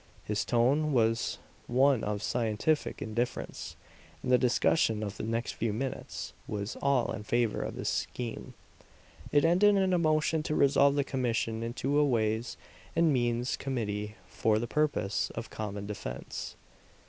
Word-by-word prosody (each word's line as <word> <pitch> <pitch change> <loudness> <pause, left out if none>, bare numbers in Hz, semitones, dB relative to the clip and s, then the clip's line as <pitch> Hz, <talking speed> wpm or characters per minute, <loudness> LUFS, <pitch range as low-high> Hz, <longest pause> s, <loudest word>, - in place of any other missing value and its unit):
His 105 0 -1
tone 140 +6 +2
was 115 -2 +1 0.3
one 130 +1 +3
of 105 0 -2
scientific 120 +6 0
indifference; 120 +3 -3 0.5
and 125 - -1
the 125 - +7
discussion 115 -3 +2
of 100 -1 -4
the - - -5
next 115 +2 -1
few 115 - -2
minutes 130 +4 -4
was 105 +1 -4
all 140 -3 +2
in - - -4
favor 115 +1 0
of - - -4
his - - -2
scheme. 120 -2 -4 0.8
It 145 +1 +4
ended 195 +5 +5
in 190 -1 +2
a 180 - +3
motion 155 0 +2
to 155 0 -2
resolve 140 0 +4
the 140 - +2
commission 115 -4 -1
into 130 +5 0
a - - +5
ways 115 -3 0 0.4
and 165 -2 +4
means 120 0 0
committee 105 -5 -3
for 110 -1 +1
the 115 - -1
purpose 145 -8 0
of 115 0 -6
common 105 -2 -5
defense. 105 0 -6
120 Hz, 150 wpm, -30 LUFS, 110-140 Hz, 0.8 s, the